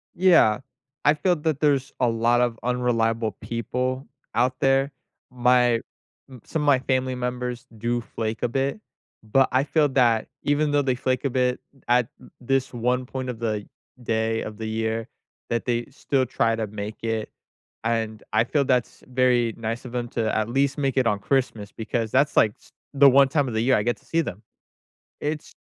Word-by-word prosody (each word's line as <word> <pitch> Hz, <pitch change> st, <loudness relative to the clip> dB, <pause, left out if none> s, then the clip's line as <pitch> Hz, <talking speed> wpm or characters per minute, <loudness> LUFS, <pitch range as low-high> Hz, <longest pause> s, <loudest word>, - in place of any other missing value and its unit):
Yeah, 170 Hz, -, +5 dB, 0.5 s
I 150 Hz, -, +6 dB
feel 180 Hz, +3 st, +2 dB
that 150 Hz, -2 st, -1 dB
there's 140 Hz, -3 st, +2 dB
a 125 Hz, -, +3 dB
lot 115 Hz, +1 st, +2 dB
of 120 Hz, -2 st, 0 dB
unreliable 115 Hz, -3 st, +1 dB
people 125 Hz, +3 st, -3 dB, 0.3 s
out 130 Hz, +2 st, +1 dB
there. 135 Hz, +1 st, +2 dB, 0.4 s
My 125 Hz, -1 st, +4 dB, 0.5 s
m 125 Hz, -4 st, -12 dB
some 160 Hz, -, -2 dB
of 150 Hz, -, -1 dB
my 140 Hz, -3 st, +5 dB
family 130 Hz, -1 st, 0 dB
members 125 Hz, 0 st, -3 dB
do 120 Hz, +2 st, -1 dB
flake 110 Hz, -1 st, -4 dB
a -, -, +3 dB
bit, 135 Hz, -, -1 dB, 0.4 s
but, 130 Hz, +5 st, +3 dB
I 130 Hz, +2 st, +3 dB
feel 150 Hz, -1 st, +2 dB
that 120 Hz, -4 st, +3 dB, 0.2 s
even 145 Hz, +1 st, +1 dB
though 145 Hz, 0 st, +3 dB
they 130 Hz, -2 st, 0 dB
flake 130 Hz, +1 st, -1 dB
a 140 Hz, -, +2 dB
bit 125 Hz, 0 st, +1 dB, 0.3 s
at 120 Hz, -1 st, +3 dB
u -, -, -15 dB
this 135 Hz, +1 st, 0 dB
one 125 Hz, +2 st, 0 dB
point 130 Hz, 0 st, -5 dB
of, 120 Hz, -1 st, -6 dB
like, 105 Hz, -3 st, -2 dB, 0.4 s
day 110 Hz, 0 st, 0 dB
of 105 Hz, -1 st, -7 dB
the 110 Hz, -1 st, -4 dB
year, 110 Hz, 0 st, -2 dB, 0.4 s
that 115 Hz, -1 st, -1 dB
they 120 Hz, -1 st, 0 dB
still 135 Hz, -1 st, 0 dB
try 115 Hz, -2 st, +1 dB
to 110 Hz, -1 st, -2 dB
make 105 Hz, +1 st, -6 dB
it, 115 Hz, -1 st, -2 dB, 0.5 s
and, 115 Hz, -1 st, -1 dB
I 110 Hz, +2 st, +4 dB
feel 145 Hz, +2 st, +1 dB
that's 125 Hz, -2 st, 0 dB
very 125 Hz, -2 st, +2 dB
nice 115 Hz, +1 st, -4 dB
of 125 Hz, -, -8 dB
'em 120 Hz, -1 st, -2 dB
to 110 Hz, -2 st, -1 dB
at 110 Hz, -1 st, +1 dB
least 135 Hz, +3 st, +1 dB
make 135 Hz, -2 st, -1 dB
it 125 Hz, -3 st, +3 dB
on 105 Hz, -2 st, +1 dB
Christmas, 115 Hz, -4 st, -1 dB
because 115 Hz, 0 st, -3 dB
that's 140 Hz, +3 st, +2 dB
like 110 Hz, -, +5 dB
s -, -, -22 dB, 0.2 s
the 140 Hz, 0 st, +7 dB
one 135 Hz, +1 st, +6 dB
time 145 Hz, -2 st, +1 dB
of 120 Hz, -, -4 dB
the 110 Hz, -, 0 dB
year 130 Hz, +2 st, +4 dB
I 105 Hz, -, 0 dB
get 120 Hz, +2 st, 0 dB
to -, -, -26 dB
see 165 Hz, 0 st, +1 dB
them. 105 Hz, -, -6 dB, 0.8 s
It's 150 Hz, +1 st, -4 dB
125 Hz, 190 wpm, -24 LUFS, 115-135 Hz, 0.8 s, the